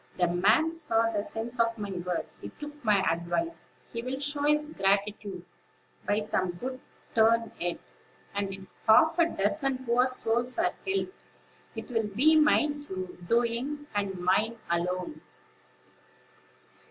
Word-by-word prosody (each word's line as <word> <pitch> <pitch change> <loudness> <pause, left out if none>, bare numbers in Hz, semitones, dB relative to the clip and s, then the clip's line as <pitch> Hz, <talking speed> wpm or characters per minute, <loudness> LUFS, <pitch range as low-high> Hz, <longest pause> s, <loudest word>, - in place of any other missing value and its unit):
the 180 - +3
man 215 - +3
saw 230 -8 +1
the 205 -2 -1
sense 235 +3 -6
of 230 0 +2
my 205 -2 -4
words; 180 -1 -4
he - - -6
took 295 -1 -10
my 210 -3 +4
advice; 175 - -3 0.2
he 230 - -3
will 255 +2 -4
show 290 +1 -1
his 300 +1 +2
gratitude 200 - -1 0.6
by 205 +1 +2
some 185 -4 -1
good 255 +8 -5 0.3
turn 230 0 +4
yet; 175 0 -1 0.6
and, 200 -1 -2
if 195 0 -8 0.2
half 320 +9 +6
a 335 - +6
dozen 260 +5 -1
poor 245 +2 +3
souls 245 0 0
are - - +2
helped, 385 -1 -1 0.6
it - - -7
will 225 -3 0
be 310 +7 +5
my 300 0 +5 0.6
doing, 240 +6 0
and 200 -2 -1
mine 210 +6 +2
alone." 180 - -1
230 Hz, 140 wpm, -29 LUFS, 195-275 Hz, 0.6 s, half